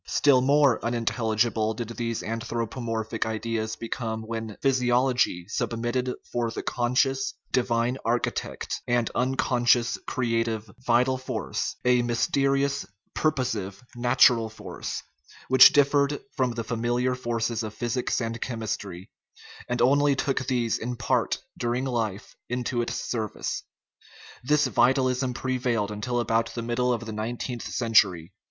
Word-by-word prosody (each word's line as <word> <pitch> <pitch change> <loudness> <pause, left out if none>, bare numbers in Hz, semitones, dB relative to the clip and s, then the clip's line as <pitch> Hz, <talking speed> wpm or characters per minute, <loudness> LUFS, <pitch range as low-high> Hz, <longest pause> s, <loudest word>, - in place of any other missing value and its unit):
Still 140 -3 +4
more 140 -2 +4
unintelligible 115 -1 0
did 120 0 -5
these 115 -1 -3
anthro 115 +1 -3
pomorphic 115 -2 -3
ideas 110 0 -2
become 110 -1 -4
when 110 -1 -5
physiology 125 -7 +2
substituted 120 +4 -1 0.2
for 120 -1 0
the - - -5
conscious, 135 +11 0 0.2
divine 120 +1 +1
architect 120 +1 -2
an 120 -1 +2
unconscious, 120 -3 +2
creative 115 -3 -1
"vital 125 +1 +2
force" 130 -4 -3
a 125 0 +4
mysterious, 140 +3 +1 0.3
purposive, 125 -10 -1
nat 120 +3 +6
ural 115 -3 0
force, 110 - -6 0.5
which 130 0 +9
differed 145 0 +3 0.2
from 130 -4 +1
the 115 0 -3
familiar 120 +2 0
forces 115 -2 -2
of 110 -2 -4
physics 120 +2 -1
and 115 -1 -3
chemistry, 100 -6 -4 0.6
and 125 0 +1
only 140 +2 +4
took 135 -1 -1
these 120 -3 0
in 120 +2 -3
part, 120 0 0 0.2
during 120 +1 -1
life, 110 -6 -3
into 125 0 -1
its 120 - -3
service. 110 -4 -3 0.8
This 150 +3 +3
vitalism 130 0 +2
prevailed 125 -5 -1
until 120 +4 -2
about 115 0 0
the 115 - -3
middle 120 +2 0
of 115 -1 -2
the 110 - -5
nineteenth 120 +2 -4
century. 95 -7 +2
120 Hz, 125 wpm, -26 LUFS, 115-130 Hz, 0.8 s, which